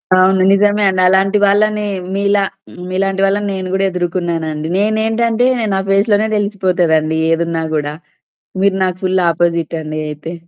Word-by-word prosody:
అవును. 185 Hz, +1 st, +3 dB
నిజమే 205 Hz, +1 st, +2 dB
అండి. 185 Hz, -1 st, 0 dB
అలాంటి 195 Hz, +2 st, +3 dB
వాళ్ళని 210 Hz, +1 st, +1 dB, 0.3 s
మీలా, 200 Hz, 0 st, +1 dB, 0.5 s
మీలాంటి 195 Hz, +1 st, -1 dB
వాళ్ళని 205 Hz, +1 st, 0 dB
నేను 185 Hz, -1 st, -4 dB
కూడా 195 Hz, 0 st, +1 dB
ఎదుర్కున్నానండి. 170 Hz, -3 st, -3 dB
నేనేంటంటే, 225 Hz, +3 st, +1 dB, 0.3 s
నా 190 Hz, -, +1 dB
ఫేస్‌ 200 Hz, +3 st, +2 dB
లోనే 215 Hz, +2 st, +2 dB
తెలిసిపోతదండి 175 Hz, -6 st, 0 dB
ఏదున్నా 165 Hz, 0 st, -1 dB
గూడా. 150 Hz, -1 st, -2 dB, 0.7 s
మీరు 200 Hz, -1 st, +2 dB
నాకు 185 Hz, -1 st, -3 dB
ఫుల్ 185 Hz, 0 st, +1 dB
ఆపోజిట్ 170 Hz, -1 st, -1 dB
అండి 155 Hz, 0 st, -5 dB
అయితే. 150 Hz, +3 st, -7 dB
190 Hz, 135 wpm, -15 LUFS, 170-205 Hz, 0.7 s, అవును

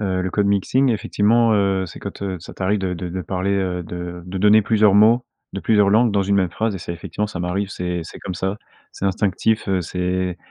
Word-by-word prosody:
heu, 95 Hz, -3 st, -1 dB
le 90 Hz, 0 st, -2 dB
code-mixing, 100 Hz, +6 st, +2 dB
effectivement, 115 Hz, +1 st, +2 dB
heu, 95 Hz, -2 st, +1 dB
c'est -, -, -11 dB
quand, -, -, -7 dB
heu, 95 Hz, -2 st, -3 dB
ça -, -, -10 dB
t'arrive 100 Hz, +2 st, -1 dB
de 95 Hz, -1 st, -2 dB
de 90 Hz, 0 st, -5 dB
de 90 Hz, +1 st, -4 dB
parler, 95 Hz, +3 st, -2 dB
heu, 90 Hz, -3 st, -1 dB
de 90 Hz, +1 st, -6 dB
de 95 Hz, +1 st, -5 dB
donner 105 Hz, +2 st, +5 dB
plusieurs 105 Hz, -2 st, +3 dB
mots 115 Hz, +4 st, +5 dB, 0.3 s
de 100 Hz, -, -4 dB
plusieurs 105 Hz, -2 st, +3 dB
langues 110 Hz, +3 st, +4 dB
dans 100 Hz, -1 st, +1 dB
une 100 Hz, +1 st, +1 dB
même 95 Hz, -3 st, +2 dB
phrase 110 Hz, +3 st, -1 dB
et -, -, -4 dB
c'est 85 Hz, -, -6 dB
effectivement, 105 Hz, +5 st, -4 dB
ça 95 Hz, -, -6 dB
m'arrive, 95 Hz, +3 st, -2 dB
c'est 90 Hz, -2 st, -3 dB
c'est 80 Hz, -, -10 dB
comme 90 Hz, -, -6 dB
ça. 95 Hz, +3 st, -2 dB, 0.3 s
C'est -, -, -7 dB
instinctif, 100 Hz, +3 st, 0 dB
heu, 95 Hz, -1 st, +1 dB
c'est, 90 Hz, +2 st, -5 dB
heu, 90 Hz, 0 st, -1 dB
95 Hz, 235 wpm, -21 LUFS, 90-105 Hz, 0.3 s, donner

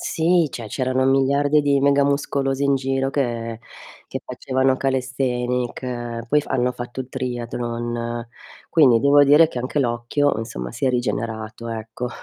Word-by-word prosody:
Sì, 165 Hz, -1 st, +2 dB
cioè, 115 Hz, -3 st, -6 dB
c'erano 130 Hz, +3 st, 0 dB
miliardi 140 Hz, +2 st, +3 dB
di 140 Hz, -1 st, +2 dB
mega 140 Hz, 0 st, +4 dB
muscolosi 140 Hz, -1 st, 0 dB
in 140 Hz, 0 st, +3 dB
giro 135 Hz, 0 st, -1 dB
che 115 Hz, -4 st, -2 dB, 0.5 s
che -, -, -5 dB
facevano 130 Hz, 0 st, 0 dB
calisthenic, 125 Hz, -2 st, -2 dB
poi 150 Hz, +4 st, +3 dB
f -, -, -12 dB
hanno 125 Hz, -1 st, +1 dB
fatto 120 Hz, +1 st, -6 dB
il 130 Hz, -, -6 dB
triathlon. 120 Hz, -2 st, -4 dB, 0.4 s
Quindi, 135 Hz, -8 st, +5 dB
devo 145 Hz, +2 st, +6 dB
dire 150 Hz, +4 st, +6 dB
che 130 Hz, -, -6 dB
anche 130 Hz, +4 st, -2 dB
l'occhio, 125 Hz, +3 st, +1 dB
insomma, 60 Hz, -, -5 dB
si -, -, -4 dB
è -, -, +3 dB
rigenerato 115 Hz, -2 st, -3 dB
ecco. 115 Hz, +2 st, -5 dB
130 Hz, 145 wpm, -22 LUFS, 120-140 Hz, 0.5 s, devo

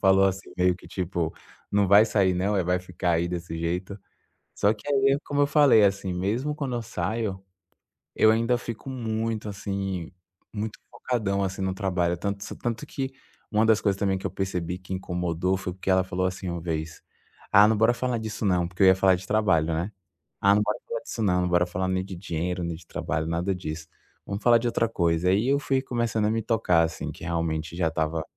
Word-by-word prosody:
Falou, 95 Hz, 0 st, +5 dB
assim, 95 Hz, 0 st, -1 dB
meio 90 Hz, 0 st, +3 dB
que 90 Hz, -, -14 dB
tipo: 85 Hz, -3 st, -2 dB, 0.4 s
"Não 100 Hz, -1 st, +3 dB
vai 100 Hz, +3 st, +7 dB
sair, 100 Hz, -4 st, +2 dB
não, 100 Hz, +3 st, 0 dB
é? 95 Hz, -, +1 dB
Vai 90 Hz, +1 st, +1 dB
ficar 90 Hz, -1 st, -2 dB
aí 85 Hz, +1 st, +1 dB
desse 85 Hz, -1 st, -4 dB
jeito?" 90 Hz, +4 st, -3 dB, 0.6 s
Só 105 Hz, +1 st, +3 dB
que 105 Hz, +3 st, -12 dB
aí, 135 Hz, 0 st, +3 dB
como 145 Hz, 0 st, 0 dB
eu -, -, +4 dB
falei, 140 Hz, -8 st, +6 dB
assim, 95 Hz, -1 st, +1 dB
mesmo 115 Hz, +11 st, -1 dB
quando 140 Hz, -4 st, -3 dB
eu 120 Hz, -, -2 dB
saio, 100 Hz, 0 st, -3 dB, 0.7 s
eu 110 Hz, -, +5 dB
ainda 115 Hz, +2 st, +2 dB
fico 120 Hz, +2 st, -7 dB
muito, 115 Hz, -3 st, -2 dB
assim, 95 Hz, -3 st, -4 dB, 0.4 s
muito 110 Hz, 0 st, -4 dB
focadão, 100 Hz, -5 st, -1 dB
assim, 95 Hz, 0 st, -3 dB
no 95 Hz, -1 st, 0 dB
trabalho, 90 Hz, -3 st, 0 dB
tanto 100 Hz, +2 st, -3 dB
se -, -, -7 dB
tanto 115 Hz, -1 st, -3 dB
que 135 Hz, -1 st, -4 dB, 0.4 s
uma 110 Hz, +1 st, +3 dB
das 110 Hz, -1 st, +4 dB
coisas 100 Hz, -2 st, +1 dB
também 95 Hz, -1 st, +1 dB
que 95 Hz, -, -8 dB
eu 95 Hz, -, -1 dB
percebi 90 Hz, -2 st, -3 dB
que 95 Hz, 0 st, -7 dB
incomodou 90 Hz, 0 st, -1 dB
foi 90 Hz, -1 st, -5 dB
porque 95 Hz, +1 st, -5 dB
ela 95 Hz, 0 st, +4 dB
falou 95 Hz, 0 st, -2 dB
assim 95 Hz, 0 st, -3 dB
uma 85 Hz, 0 st, -3 dB
vez: 80 Hz, -1 st, -4 dB, 0.5 s
"Ah, 105 Hz, +1 st, +8 dB
não. 110 Hz, -, +2 dB
Bora 115 Hz, +3 st, +4 dB
falar 125 Hz, 0 st, -1 dB
disso 110 Hz, 0 st, -5 dB
não." 90 Hz, -3 st, +2 dB
Porque 90 Hz, +2 st, -7 dB
eu 95 Hz, -, +8 dB
ia 95 Hz, -, +7 dB
falar 95 Hz, 0 st, +4 dB
de 95 Hz, +2 st, -8 dB
trabalho, 95 Hz, -8 st, +2 dB
né? 85 Hz, +6 st, -2 dB, 0.5 s
"Ah, 100 Hz, +1 st, +5 dB
não. 105 Hz, -, +3 dB
Bora 105 Hz, 0 st, -1 dB
falar 115 Hz, -, -3 dB
disso 115 Hz, -, -6 dB
não, 90 Hz, -3 st, +2 dB
não 90 Hz, -, 0 dB
bora 90 Hz, 0 st, +3 dB
falar 95 Hz, +1 st, -2 dB
nem 95 Hz, 0 st, 0 dB
de 95 Hz, -1 st, -8 dB
dinheiro, 90 Hz, 0 st, -3 dB
nem 85 Hz, -1 st, -3 dB
de 80 Hz, +1 st, -14 dB
trabalho, 80 Hz, +1 st, -2 dB
nada 85 Hz, +4 st, 0 dB
disso. 80 Hz, -3 st, -6 dB, 0.4 s
Vamo 100 Hz, 0 st, -4 dB
falar 120 Hz, -1 st, +6 dB
de 120 Hz, +1 st, -1 dB
outra 115 Hz, -1 st, +1 dB
coisa." 85 Hz, -4 st, +1 dB
Aí 105 Hz, +7 st, +2 dB
eu 140 Hz, +1 st, +3 dB
fui 135 Hz, -2 st, 0 dB
começando 120 Hz, -4 st, -1 dB
a 105 Hz, -, +2 dB
me 115 Hz, 0 st, 0 dB
tocar, 100 Hz, -7 st, +2 dB
assim, 80 Hz, -1 st, -3 dB
que -, -, -12 dB
realmente 80 Hz, -1 st, -2 dB
já 85 Hz, -2 st, 0 dB
tava 80 Hz, 0 st, -1 dB
95 Hz, 220 wpm, -26 LUFS, 90-110 Hz, 0.7 s, Ah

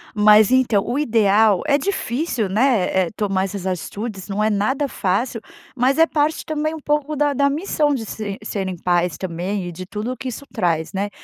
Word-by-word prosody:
Mas 210 Hz, 0 st, +6 dB
então, 245 Hz, -6 st, +3 dB
o 245 Hz, +4 st, -2 dB
ideal, 220 Hz, -6 st, +3 dB
é 285 Hz, -1 st, +4 dB
difícil, 270 Hz, -, -2 dB
né, 220 Hz, -1 st, +2 dB, 0.2 s
eh, -, -, -5 dB
tomar 195 Hz, -3 st, 0 dB
essas 195 Hz, -1 st, -6 dB
atitudes 190 Hz, +2 st, -4 dB
não 205 Hz, +1 st, -1 dB
é 215 Hz, -, +3 dB
nada 260 Hz, +8 st, 0 dB
fácil, 225 Hz, +2 st, -1 dB, 0.3 s
mas 260 Hz, +3 st, +2 dB
é 325 Hz, -, +6 dB
parte 305 Hz, +1 st, 0 dB
também 310 Hz, 0 st, -2 dB
um 320 Hz, -, -6 dB
pouco 295 Hz, 0 st, -1 dB
da 290 Hz, 0 st, +1 dB
da 280 Hz, +1 st, +2 dB
missão 300 Hz, -1 st, 0 dB
de 240 Hz, -5 st, -3 dB
se 205 Hz, -2 st, -5 dB
de 215 Hz, -, -13 dB
serem 190 Hz, -3 st, -3 dB
pais 175 Hz, -2 st, 0 dB
também, 185 Hz, +2 st, -3 dB
e 175 Hz, -, -5 dB
de 185 Hz, +2 st, -8 dB
tudo 210 Hz, +6 st, -4 dB
o 255 Hz, -, -6 dB
que 265 Hz, -, -6 dB
isso 265 Hz, +4 st, -8 dB
traz, 170 Hz, -7 st, -1 dB
né, 200 Hz, +1 st, -2 dB
220 Hz, 205 wpm, -21 LUFS, 195-275 Hz, 0.3 s, Mas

